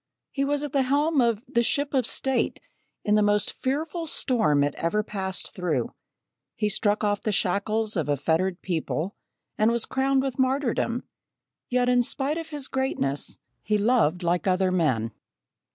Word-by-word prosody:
He 275 - -1
was 290 +1 0
at 295 - -4
the 275 - +3
helm 285 +3 +2
of 230 -2 +1
"the 240 -3 +2
Ship 285 +4 0
of 255 -4 +2
State" 265 -2 0 0.5
in 210 - +2
the 210 - +5
most 205 0 +2
fearful 315 +5 -2
storm 220 - +2
it 145 0 0
ever 210 +6 0
passed 190 -3 -4
through; 160 - -1 0.6
he 210 - 0
struck 205 +1 +1
off 205 -1 +1
the 215 - -1
shackles 210 +3 0
of 160 -4 -1
a 145 - +2
fettered 170 +6 0
people, 175 +1 -2 0.4
and 215 +1 +5
was 235 -1 0
crowned 265 0 +1
with 270 -1 -3
martyrdom; 255 -2 +1 0.7
yet 250 0 +2
in 250 0 +4
spite 275 +6 -2
of 325 - -7
his 290 -3 -5
greatness, 265 - -2 0.2
he 210 0 +1
loved 205 -6 +2
like 175 +2 0
other 185 0 +2
men. 130 -11 +1
220 Hz, 170 wpm, -26 LUFS, 185-265 Hz, 0.7 s, the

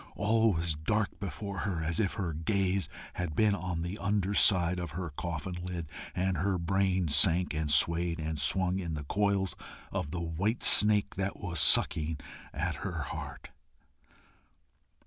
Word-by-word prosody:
All 110 +1 +2
was 85 -1 -1
dark 100 +8 -2
before 100 0 -6
her, 90 -6 -3
as 80 +1 -2
if 100 -4 0
her 90 -6 -3
gaze 95 +2 -1 0.2
had 90 -4 -5
been 105 +1 +3
on 90 -4 -4
the 90 +4 -6
underside 95 -3 +3
of 85 -3 -6
her 85 -1 -5
coffin 85 +3 -6
lid, 90 -3 -5 0.3
and 95 0 -1
her 95 +3 -1
brain 95 0 0
sank 85 +4 +3
and 75 0 -3
swayed 85 +3 +2
and 80 -2 -3
swung 95 +4 +2
in 85 -4 -4
the 75 - -6
coils 100 +3 -1 0.4
of - - -3
the 85 - -5
white 85 +8 -2
snake 105 -1 +6
that 100 0 -3
was 90 -3 -3
sucking 80 0 +5 0.3
at - - -3
her - - -5
heart. - - -9
90 Hz, 155 wpm, -29 LUFS, 80-100 Hz, 0.4 s, snake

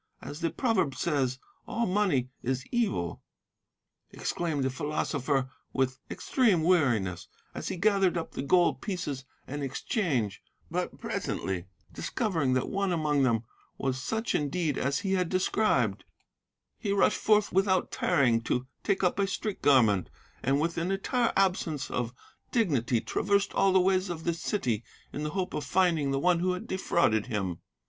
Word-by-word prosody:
As 145 - -8
the 165 - 0
proverb 195 - +1
says, 140 -4 0 0.3
"'All 235 0 0
money 180 - +1
is 130 +1 -2
evil,' 95 - -1 0.9
exclaimed 160 -5 -2
the 130 - 0
philosopher 135 -1 -1 0.2
with 130 -1 0
extreme 215 - +2
weariness, 120 - +2 0.3
as - - -5
he - - -3
gathered 195 -2 +3
up 165 - -4
the - - -4
gold 175 +5 +3
pieces 150 - -4 0.2
in 145 +2 -4
exchange, 135 - -1 0.3
but - - -2
presently 95 -2 -3 0.3
discovering 160 -11 0
that 130 - +1
one 195 -1 0
among 150 -4 +1
them 115 -4 +2 0.3
was 130 -1 -2
such 220 - -1
indeed 150 0 0
as 140 +2 0
he 195 -1 -1
had 180 -3 +1
described, 185 - +1 0.8
he 200 - -2
rushed 200 - +3
forth 210 -1 +3
without 190 0 +2
tarrying 120 -5 +2
to 125 +2 -1 0.2
take 195 -1 0
up 180 +2 +2
a 200 - +2
street 205 +1 -3
garment; 115 -10 +4 0.3
and 135 +2 +2
with 165 +2 0
an 170 +2 -1
entire 230 +5 +1
absence 180 -7 +1
of 120 -1 -1 0.4
dignity 140 - +2
traversed 200 - 0
all 195 - +3
the 190 - +5
ways 185 0 +2
of 165 -2 -5
the 170 - +1
city 130 - -1 0.3
in 145 - -4
the 150 - -2
hope 185 -1 -1
of 150 - -2
finding 165 -1 +2
the 135 - 0
one 175 +4 +3
who 180 +1 +1
had 180 - -5
defrauded 170 - +1
him." 95 -7 -2
160 Hz, 155 wpm, -29 LUFS, 130-190 Hz, 0.9 s, the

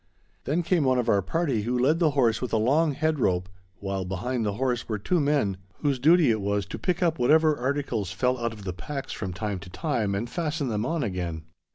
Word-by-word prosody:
Then 165 +5 0
came 170 -2 +2
one 130 -1 +3
of 120 -1 0
our 100 -2 +4
party 135 - 0
who 120 +4 -1
led 140 +7 +3
the 165 -3 +4
horse 115 -4 +3
with 125 - -3
a - - +4
long 145 +8 +2
head 155 +1 0
rope, 90 -5 +1 0.3
while 95 -1 -3
behind 110 +7 -2
the 105 -2 -1
horse 125 +1 -1
were 110 - -1
two 175 - 0
men 140 -10 +1 0.2
whose 140 -3 +1
duty 155 0 +5
it 110 -2 0
was 100 0 0
to - - -7
pick 180 -1 0
up 165 -4 +1
whatever 155 +5 +4
articles 125 -7 -2
fell 125 +6 0
out 115 0 -1
of 105 -2 -10
the 90 -2 -4
packs 135 - -6
from 95 -3 -4
time 100 +1 -3
to 95 0 -11
time, 105 - -1
and 110 +5 -2
fasten 150 -1 -2
them 110 +1 -1
on 165 -2 -1
again. 90 -6 -3
125 Hz, 230 wpm, -26 LUFS, 100-150 Hz, 0.3 s, duty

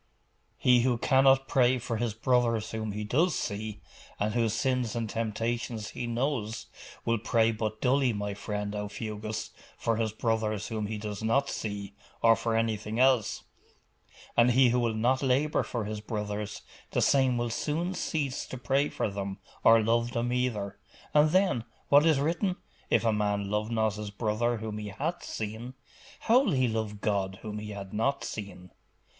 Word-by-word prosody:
'He 125 -1 +5
who 125 -1 +2
cannot 135 +1 +4
pray 130 -1 +3
for 115 -1 -3
his 110 -2 -1
brothers 115 -2 +1
whom 110 -1 -3
he 105 +1 -4
does 155 - +2
see, 105 +1 -4 0.4
and 105 +1 0
whose 115 -2 +1
sins 125 -1 0
and 115 -1 -1
temptations 115 0 -2
he 120 - -5
knows, 120 -2 -2 0.4
will 115 -1 +1
pray 115 0 +2
but 110 -1 -3
dully, 130 0 +3
my 105 -1 -3
friend 105 0 -4
Aufugus, 105 +1 -4 0.3
for 115 -1 0
his 110 -1 0
brothers 110 -2 -1
whom 110 -2 -2
he 110 0 -4
does 105 -1 -5
not 135 +6 +2
see, 100 -2 -4 0.3
or 115 0 +7
for 115 0 -1
anything 110 0 -1
else. 130 -4 +3 0.9
And 120 +1 +5
he 130 0 +6
who 125 +1 +2
will 115 -2 0
not 125 +4 +2
labour 140 +3 +2
for 115 -4 -3
his 105 0 -4
brothers, 105 -1 -4 0.3
the - - 0
same 130 -3 +3
will 120 -1 -1
soon 165 +9 -1
cease 150 -6 -2
to 130 - -6
pray 135 +4 +1
for - - -1
them, 100 -1 -4 0.3
or 115 0 +7
love 115 +2 +1
them 120 +1 0
either. 115 -6 -1 0.3
And 150 +1 +5
then, 185 - +2 0.3
what 145 +3 +6
is 155 -4 +4
written? 170 +5 0 0.3
"If - - +3
a 110 - +3
man 105 -1 0
love 105 +1 0
not 110 -2 +1
his 105 -1 -5
brother 110 +3 0
whom 110 -1 -5
he 105 - -5
hath 150 - -3
seen, 110 +4 -5 0.5
how 235 +3 +5
will 270 - +1
he 130 -2 +3
love 110 -2 -3
God 95 -3 0
whom 105 -1 -5
he 105 0 -7
hath 100 -2 -7
not 135 +6 0
seen?" 100 -4 -7
115 Hz, 175 wpm, -29 LUFS, 105-125 Hz, 0.9 s, or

